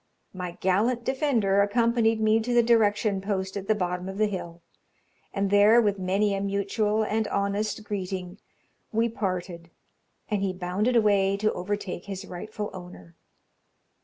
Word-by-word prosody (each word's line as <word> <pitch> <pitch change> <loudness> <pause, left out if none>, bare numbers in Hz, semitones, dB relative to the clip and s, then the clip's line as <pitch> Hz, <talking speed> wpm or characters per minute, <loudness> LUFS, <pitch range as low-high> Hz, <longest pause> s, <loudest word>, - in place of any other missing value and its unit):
My 180 -2 -5
gallant 220 +6 +1
defender 235 -8 +2
accompanied 225 +1 +2
me 215 0 +3
to 240 +2 -1
the 240 - +6
direction 215 -3 +2
post 190 -1 -3
at 195 -1 -5
the 215 - +3
bottom 180 -1 -2
of 195 - -7
the 215 - +3
hill, 175 -4 -6 0.7
and 195 -1 -1
there, 205 +3 +6
with 205 -3 +1
many 195 +3 +1
a 195 - -2
mutual 200 +2 0
and 215 0 -1
honest 200 +2 -1
greeting, 190 -2 -5 0.5
we 225 +1 +2
parted, 180 -5 -4 0.6
and 210 -3 -1
he 195 -1 0
bounded 185 +7 -1
away 200 -3 +3
to 215 +1 +1
overtake 185 -1 -4
his 195 -1 -6
rightful 210 +3 -6
owner. 175 - -11
200 Hz, 150 wpm, -26 LUFS, 190-215 Hz, 0.7 s, the